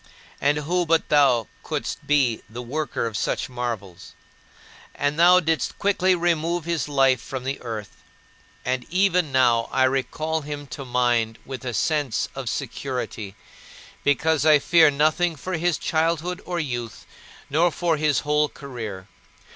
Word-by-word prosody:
And 145 Hz, +1 st, +3 dB
who 170 Hz, +4 st, 0 dB
but 165 Hz, 0 st, +2 dB
thou 135 Hz, -6 st, +4 dB, 0.2 s
couldst -, -, -4 dB
be 135 Hz, -6 st, +2 dB
the 120 Hz, +3 st, -7 dB
worker 150 Hz, +1 st, -2 dB
of 115 Hz, -2 st, -4 dB
such -, -, -1 dB
marvels? 115 Hz, -8 st, -5 dB, 0.8 s
And 145 Hz, +2 st, -1 dB
thou 180 Hz, +2 st, +7 dB
didst 160 Hz, -5 st, -1 dB
quickly 190 Hz, -2 st, +2 dB
remove 170 Hz, -1 st, 0 dB
his 170 Hz, -3 st, -2 dB
life 135 Hz, -3 st, +3 dB
from 130 Hz, 0 st, -6 dB
the 135 Hz, +1 st, -4 dB
earth, 110 Hz, -5 st, -7 dB, 0.6 s
and 130 Hz, -1 st, -1 dB
even 180 Hz, -3 st, +2 dB
now 120 Hz, -3 st, +3 dB
I 130 Hz, -, +2 dB
recall 140 Hz, +5 st, 0 dB
him 145 Hz, 0 st, -6 dB
to 135 Hz, +1 st, -6 dB
mind 120 Hz, -2 st, +1 dB
with 130 Hz, -1 st, -7 dB
a 120 Hz, -3 st, -3 dB
sense 145 Hz, +1 st, 0 dB
of 135 Hz, -3 st, -4 dB
security, 125 Hz, -6 st, -4 dB, 0.7 s
because 145 Hz, +1 st, +2 dB
I 155 Hz, -1 st, +7 dB
fear 165 Hz, +2 st, +5 dB
nothing 155 Hz, +4 st, +1 dB
for 185 Hz, +5 st, -6 dB
his 175 Hz, 0 st, +1 dB
childhood 165 Hz, +3 st, -1 dB
or 175 Hz, -1 st, -2 dB
youth, 120 Hz, -7 st, -4 dB, 0.4 s
nor 165 Hz, +5 st, +3 dB
for 170 Hz, -2 st, 0 dB
his 150 Hz, -2 st, +1 dB
whole 150 Hz, 0 st, +1 dB
career. 110 Hz, -9 st, -7 dB
145 Hz, 145 wpm, -24 LUFS, 125-160 Hz, 0.8 s, thou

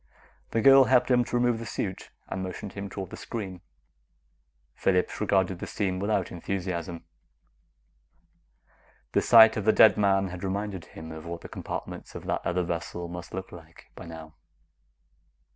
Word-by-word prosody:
The 115 Hz, -, 0 dB
girl 135 Hz, +2 st, +8 dB
helped 125 Hz, 0 st, +3 dB
him 125 Hz, -1 st, +5 dB
to -, -, -4 dB
remove 120 Hz, -1 st, +2 dB
the 115 Hz, -, -6 dB
suit 95 Hz, -2 st, -4 dB, 0.2 s
and 95 Hz, -, -4 dB
motioned 95 Hz, +1 st, -6 dB
him 100 Hz, 0 st, -6 dB
toward 95 Hz, -2 st, -6 dB
the -, -, -7 dB
screen. 95 Hz, -6 st, -6 dB, 1.1 s
Phillips 90 Hz, +1 st, 0 dB
regarded 95 Hz, -3 st, +1 dB
the -, -, -5 dB
scene 95 Hz, -3 st, -2 dB
without 105 Hz, +2 st, 0 dB
enthusiasm. 85 Hz, -2 st, -4 dB, 2.1 s
The -, -, +2 dB
sight 110 Hz, -1 st, +7 dB
of 105 Hz, -, -3 dB
the 110 Hz, -, +6 dB
dead 110 Hz, -, +6 dB
man 95 Hz, -2 st, +2 dB
had 90 Hz, +1 st, -8 dB
reminded 100 Hz, -1 st, -3 dB
him 80 Hz, 0 st, -10 dB
of 80 Hz, 0 st, -9 dB
what 85 Hz, 0 st, -6 dB
the -, -, -10 dB
compartments -, -, -7 dB
of -, -, -7 dB
that -, -, -1 dB
other 90 Hz, +1 st, 0 dB
vessel 85 Hz, 0 st, -4 dB
must 85 Hz, 0 st, -8 dB
look 95 Hz, 0 st, -6 dB
like 85 Hz, -1 st, -14 dB
by 90 Hz, -, -10 dB
now. 80 Hz, -1 st, -10 dB
95 Hz, 160 wpm, -27 LUFS, 85-105 Hz, 2.1 s, girl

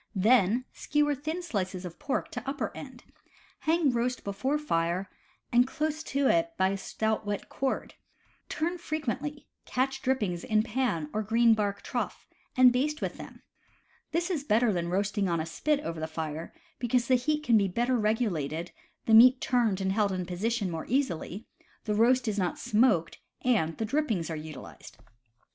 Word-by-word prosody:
Then 225 Hz, +3 st, +3 dB
skewer 295 Hz, 0 st, +1 dB
thin 310 Hz, +6 st, -4 dB
slices 190 Hz, -, -3 dB
of 170 Hz, -1 st, -8 dB
pork 285 Hz, -2 st, -2 dB
to -, -, -5 dB
upper 280 Hz, +1 st, -3 dB
end; -, -, -10 dB, 0.6 s
hang 320 Hz, -3 st, +2 dB
roast 245 Hz, +1 st, -1 dB
before 260 Hz, +9 st, -1 dB
fire 180 Hz, -, -1 dB, 0.4 s
and 245 Hz, +1 st, +5 dB
close 310 Hz, +3 st, -2 dB
to 275 Hz, +1 st, 0 dB
it 335 Hz, +2 st, +2 dB
by 190 Hz, -, +3 dB
a 195 Hz, -, -2 dB
stout 220 Hz, +3 st, -2 dB
wet 205 Hz, -1 st, -4 dB
cord; 265 Hz, -1 st, -2 dB, 0.6 s
turn 345 Hz, +3 st, -2 dB
fre 310 Hz, -2 st, -3 dB
quently; 295 Hz, 0 st, -4 dB, 0.2 s
catch 265 Hz, +1 st, -1 dB
drippings 210 Hz, -10 st, 0 dB
in 215 Hz, -1 st, +2 dB
pan 215 Hz, -, -1 dB
or 215 Hz, -, 0 dB
green 230 Hz, +2 st, +4 dB
bark 205 Hz, -2 st, -1 dB
trough, -, -, -4 dB, 0.3 s
and 255 Hz, -1 st, +7 dB
baste 300 Hz, +5 st, 0 dB
with -, -, -3 dB
them^ -, -, -10 dB, 0.7 s
This 345 Hz, +3 st, 0 dB
is 310 Hz, -6 st, -1 dB
better 230 Hz, -3 st, +3 dB
than 170 Hz, -1 st, -2 dB
roasting 200 Hz, +1 st, 0 dB
on 170 Hz, -1 st, +1 dB
a 160 Hz, -, -2 dB
spit 290 Hz, -, 0 dB
over 165 Hz, -, -5 dB
the 160 Hz, -, -3 dB
fire, 160 Hz, 0 st, -5 dB, 0.3 s
because 240 Hz, 0 st, +1 dB
the 260 Hz, -, +3 dB
heat 300 Hz, +5 st, +1 dB
can 235 Hz, -6 st, +4 dB
be 200 Hz, -, +2 dB
better 240 Hz, +7 st, 0 dB
regulated, 180 Hz, -, -1 dB, 0.3 s
the 225 Hz, -, +2 dB
meat 250 Hz, +3 st, +8 dB
turned 235 Hz, -8 st, +1 dB
and 190 Hz, 0 st, 0 dB
held 205 Hz, 0 st, +1 dB
in 185 Hz, -1 st, -2 dB
position 195 Hz, +2 st, -1 dB
more 160 Hz, -1 st, -5 dB
easily, 230 Hz, -, -1 dB, 0.4 s
the 210 Hz, -, -1 dB
roast 245 Hz, +4 st, +3 dB
is 210 Hz, -1 st, 0 dB
not 180 Hz, -2 st, -1 dB
smoked, 210 Hz, -7 st, +2 dB, 0.2 s
and 180 Hz, -11 st, +1 dB
the 225 Hz, -, -1 dB
drippings 220 Hz, -, -1 dB
are -, -, -2 dB
utilized. 155 Hz, -4 st, -10 dB
225 Hz, 175 wpm, -29 LUFS, 190-265 Hz, 0.7 s, meat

